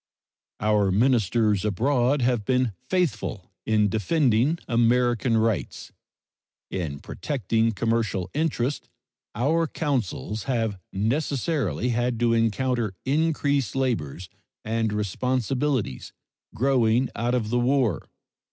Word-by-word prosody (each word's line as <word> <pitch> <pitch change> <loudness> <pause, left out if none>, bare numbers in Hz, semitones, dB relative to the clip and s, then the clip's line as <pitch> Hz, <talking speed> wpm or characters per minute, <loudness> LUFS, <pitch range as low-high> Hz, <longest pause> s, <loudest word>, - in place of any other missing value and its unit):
Our 105 -2 +2
ministers 110 -2 +2
abroad 125 +5 +1
have 120 -3 +1
been 125 +1 +1 0.2
faithful 165 - -1 0.2
in 105 -1 +3
defending 120 - +2
American 120 0 +2
rights. 110 - -1 0.8
In 80 -6 -3
protecting 115 - -1
commercial 110 -3 -1
interests 145 -3 -1 0.5
our 160 +8 +1
consuls 120 - -2
have 115 -7 -1
necessarily 125 - -1
had 120 0 0
to 120 -1 +3
encounter 115 -1 0
increased 145 -5 +1
labors 95 - -2 0.4
and 110 0 0
responsibilities 125 - -1 0.4
growing 125 -1 +2
out 120 +2 0
of 110 -3 -1
the 120 - +2
war. 120 - +1
120 Hz, 95 wpm, -25 LUFS, 105-130 Hz, 0.8 s, in